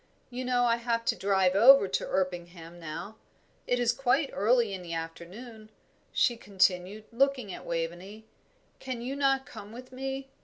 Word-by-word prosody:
You 250 +1 -4
know 250 -1 +2
I 235 -1 +3
have 230 -1 -1
to - - +2
drive 190 -2 +2
over 235 +2 +7
to 190 - -2
Erpingham 175 -2 -3
now. 170 +7 -7 0.5
It 245 - +1
is 240 -1 +3
quite 270 +3 +1
early 230 0 +2
in 190 - -5
the 170 -1 -5
afternoon," 195 +8 -8 0.4
she 240 -2 +2
continued, 195 0 0
looking 255 -4 +1
at - - -10
Waveney. 175 +6 -4 0.5
"Can 255 -3 -5
you 260 +3 -3
not 270 -1 +1
come 210 -8 -11
with 250 +3 -11
me? 270 +1 -5
220 Hz, 160 wpm, -29 LUFS, 185-255 Hz, 0.5 s, over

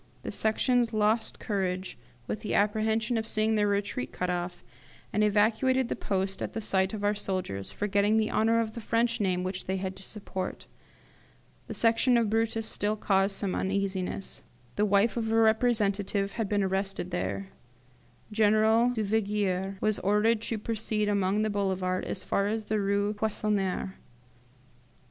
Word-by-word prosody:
The - - -4
Sections 235 +2 +1
lost 215 +1 +1
courage 185 -3 -2 0.3
with 215 - -3
the 210 - -2
apprehension 220 +2 +1
of 220 - -5
seeing 215 +1 +2
their 210 -1 +2
retreat 200 -11 -1
cut 180 0 -2
off, 175 0 -4 0.5
and 210 - +2
evacuated 225 +5 +2
the - - -1
post 195 0 -2
at - - -3
the 225 - -2
sight 190 -1 +1
of 205 - -6
our 205 0 +3
soldiers, 185 - -3
forgetting 205 +1 +1
the 220 -1 +1
honour 225 +1 +3
of 220 -1 -1
the 230 - -6
French 230 +1 +1
name 180 -2 +1
which 185 0 -4
they 190 +1 -1
had 190 0 -4
to - - -10
support. 190 -2 -5 1.0
The - - -5
Section 235 +2 +3
of 225 -3 +1
Brutus 225 0 0
still 210 -1 -1
caused 195 -1 +1
some 195 -3 -2
uneasiness. 195 -1 -2 0.3
The 210 - +2
wife 205 +3 +3
of 225 -1 -1
a - - +2
representative 215 -3 +2
had 220 -2 -3
been 205 -1 +1
arrested 190 -1 -2
there. 190 +2 -3 0.8
General 220 +2 +4
Duvigier 200 -3 0
was 215 -1 +1
ordered 210 +3 +2
to 225 0 -3
proceed 215 -1 -1
along 200 +1 +1
the 215 - 0
Boulevard 190 -2 -1
as 185 - -4
far 200 - 0
as 220 +1 -2
the 215 0 0
Rue 200 +1 +1
Poissonniere. 205 -3 -1
205 Hz, 160 wpm, -28 LUFS, 195-220 Hz, 1.0 s, General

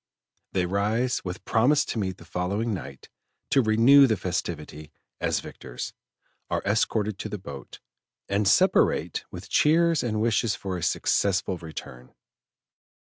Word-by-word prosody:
They 90 -2 +1
rise 105 +7 0
with 90 0 -6
promise 140 +6 +3
to 115 - -3
meet 95 -3 -2
the 85 - -14
following 100 +6 -2
night 70 -8 -8 0.4
to 135 - +5
renew 120 +5 +6
the 110 -3 +1
festivity 80 -4 -4 0.3
as - - 0
victors, - - -8 0.6
are - - -1
escorted 105 -1 0
to 105 - -4
the 105 - -4
boat, 70 -8 -10 0.5
and 100 +1 +1
separate - - +3
with - - -9
cheers 165 +1 +3
and 110 -3 -1
wishes 110 -1 +1
for 95 -2 -5
a 90 - -4
successful 95 +1 0
return. 65 -6 -10
100 Hz, 135 wpm, -26 LUFS, 90-115 Hz, 0.6 s, renew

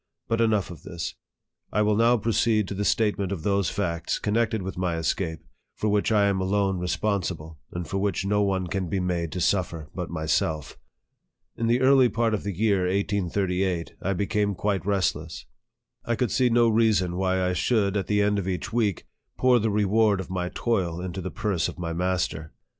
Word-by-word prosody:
But 115 0 +1
enough 110 -5 +1
of 85 - -10
this. 85 -2 -5 0.6
I 105 - +2
will 105 0 +2
now 115 +3 +4
proceed 110 -1 +1
to - - -3
the 100 +1 -2
statement 100 -3 +1
of 90 -5 -4
those 100 -2 +1
facts, 85 -4 -2
connected 110 -1 0
with 95 0 -5
my 90 -2 -1
escape, 80 0 -2 0.3
for 110 - -1
which 105 +2 +1
I 105 -2 +4
am 100 -1 +1
alone 95 0 +1
responsible, 90 -4 -2
and 85 -2 -5
for 95 - -2
which 100 0 -1
no 105 +1 +2
one 95 -2 0
can 90 0 -3
be 95 - 0
made 85 -3 -1
to 90 - -3
suffer 85 -4 -1
but 90 -2 -4
myself. 80 -2 -1 0.8
In 115 - -1
the 120 +2 +2
early 130 -1 +6
part 115 -1 0
of 105 - 0
the 100 - -2
year 100 -1 +1
1838, 95 -2 -1
1 95 0 -2
became 100 0 0
quite 100 +1 -1
restless. 85 -5 -1 0.6
I 120 - 0
could 125 -2 -1
see 125 -1 +3
no 120 0 +4
reason 110 -6 +2
why 95 0 +1
I 90 0 +1
should, 100 +2 +1
at 100 - -1
the 105 -1 +2
end 105 0 +2
of 95 - -4
each 90 0 -3
week, 110 -6 0 0.3
pour 125 -1 +4
the 110 0 0
reward 105 0 +2
of 95 - -6
my 90 -1 -2
toil 90 -8 0
into 95 +1 -5
the 95 - -4
purse 95 -6 -1
of - - -7
my 85 -2 -3
master. 90 -3 -2
100 Hz, 195 wpm, -26 LUFS, 90-105 Hz, 0.8 s, early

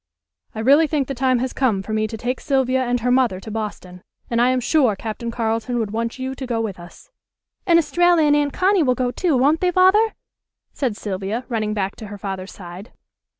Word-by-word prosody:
"I 220 - -3
really 285 +7 +5
think 285 -3 -1
the 275 - -3
time 260 0 +1
has 255 +1 -2
come 220 -8 0
for 215 - -5
me 215 0 0
to 225 - -7
take 245 +3 -3
Sylvia 260 -2 +1
and 245 -1 -1
her 250 +2 +1
mother 250 -7 +2
to 215 +3 -9
Boston, 205 -4 -6 0.3
and 235 0 +2
I 245 - +4
am 255 0 +1
sure 250 -4 +2
Captain 225 +3 -5
Carleton 230 +1 -2
would 220 -3 -2
want 230 +2 -3
you 260 0 -4
to 265 -1 -7
go 235 -2 -1
with 215 -5 -4
us." 175 0 -14 0.6
"And 340 -2 +6
Estralla 345 0 +3
and 295 -1 +4
Aunt 290 -1 +1
Connie 380 +3 +2
will 255 -4 +2
go, 250 -1 -1
too; 325 -1 0
won't 290 +5 +3
they, 365 - +2
Father?" 380 +5 +4 0.6
said 245 -7 -2
Sylvia, 205 +4 -4
running 215 -3 -1
back 195 -1 -2
to 220 - -8
her 205 0 -8
father's 195 -2 -6
side. 180 +3 -10
245 Hz, 220 wpm, -21 LUFS, 215-275 Hz, 0.6 s, And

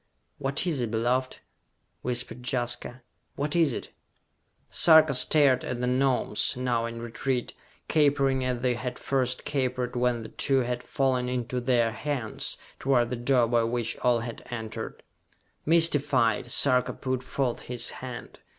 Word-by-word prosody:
"What 140 +3 -1
is 155 -7 -1
it, 120 - -1
beloved?" 125 +3 -1 0.6
whispered 120 -1 -3
Jaska. 120 0 -3 0.3
"What 145 +2 -2
is 165 -4 +4
it?" - - -6 0.8
Sarka 160 -3 +6
stared 130 0 +4
at 125 - -4
the 125 - -1
Gnomes, 130 0 +1
now 120 -2 0
in 115 0 -7
retreat, 125 +2 -2 0.3
capering 140 -3 +2
as 125 -1 -2
they 125 -1 +2
had 125 +1 -5
first 130 -2 -1
capered 125 -3 -1
when 120 -1 0
the 110 - -8
two 135 -1 +1
had 125 0 -2
fallen 130 -2 0
into 125 0 -2
their 120 -2 +2
hands, 125 -2 -3 0.2
toward 125 -3 +2
the - - 0
door 120 0 +2
by 115 0 +2
which 115 0 -1
all 120 -2 +2
had 115 0 -6
entered. 110 -3 -6 0.6
Mystified, 145 -8 +3
Sarka 125 +1 +2
put 130 0 -3
forth 130 -1 -2
his 120 -1 -3
hand. 125 -2 -8
125 Hz, 145 wpm, -27 LUFS, 120-135 Hz, 0.8 s, Sarka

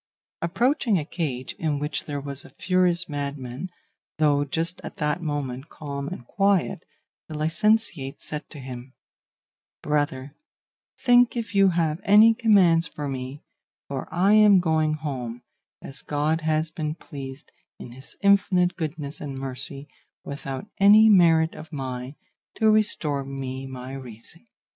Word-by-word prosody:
Approaching 225 - +1
a 150 - -2
cage 135 -7 -4
in 155 -3 0
which 150 +1 -3
there 145 -1 -4
was 140 -1 -6
a - - -13
furious 180 -1 +2
madman, 140 +1 -5 0.5
though 145 -2 +3
just 165 +5 -3
at - - -8
that 150 +3 -1
moment 145 -3 -4
calm 140 -2 -6
and 150 -7 -7
quiet, 195 0 +1 0.5
the 155 - -6
licentiate 160 -2 +1
said 150 -1 -7
to 155 - -11
him, 130 -1 -9 0.9
'Brother, 145 -2 -1 0.6
think 245 -1 +4
if 225 -2 -4
you 195 -1 +5
have 165 -1 0
any 215 +3 +7
commands 195 -8 +4
for 145 -1 -6
me, 130 +1 -6 0.4
for 135 -1 -5
I 185 +5 +3
am 210 -3 +7
going 160 -3 +1
home, 125 -6 -5 0.4
as 135 - -5
God 150 +2 0
has 155 0 0
been 155 -2 -3
pleased, 135 -4 -9 0.3
in 120 - -10
his 130 +2 -10
infinite 195 -3 +3
goodness 155 -3 -5
and 140 -2 -5
mercy, 135 +1 -5 0.4
without 140 +1 -6
any 210 +3 +7
merit 165 -5 +5
of 160 - -11
mine, 130 -2 -5 0.4
to 220 -1 +4
restore 160 -10 +1
me 135 -1 -6
my 130 0 -8
reason. 130 - -11
150 Hz, 140 wpm, -25 LUFS, 135-180 Hz, 0.9 s, any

